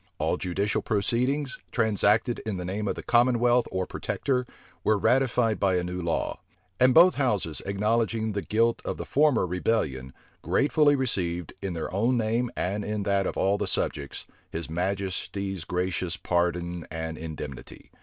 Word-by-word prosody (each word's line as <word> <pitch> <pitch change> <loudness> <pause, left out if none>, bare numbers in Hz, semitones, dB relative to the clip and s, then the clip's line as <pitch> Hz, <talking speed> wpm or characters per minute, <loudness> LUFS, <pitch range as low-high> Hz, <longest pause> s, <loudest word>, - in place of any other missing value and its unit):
All - - +1
judicial 100 +3 -1
proceedings, 125 +6 0
transacted 110 +1 +2
in 105 -4 -3
the 90 - -4
name 100 +3 -3
of - - -1
the - - -7
commonwealth 120 0 +3
or 95 0 -1
protector, 125 +6 -2 0.4
were 110 - +3
ratified 120 -2 +2
by 95 -2 +2
a 90 - +1
new 90 +1 -4
law. 85 -1 -1 0.4
And 130 +1 +6
both 175 +7 +7
houses, 105 - 0
acknowledging 110 +2 0
the 100 0 -2
guilt 115 +4 +1
of - - -3
the - - -5
former 145 -7 +3
rebellion, 85 - -1 0.3
gratefully 145 - +3
received, 90 - -2
in 95 -2 -3
their 80 +1 -4
own 115 +6 +2
name, 115 +2 0
and 100 +3 -1
in 105 0 -2
that 100 -1 +1
of - - -4
all 100 +1 +2
the - - -1
subjects, 70 -1 -2 0.2
his 80 -1 -5
majesty's 95 +1 -2
gracious 90 -1 -2
pardon 85 -1 -1
and 80 0 -4
indemnity. 75 -5 -8
100 Hz, 155 wpm, -27 LUFS, 90-115 Hz, 0.4 s, both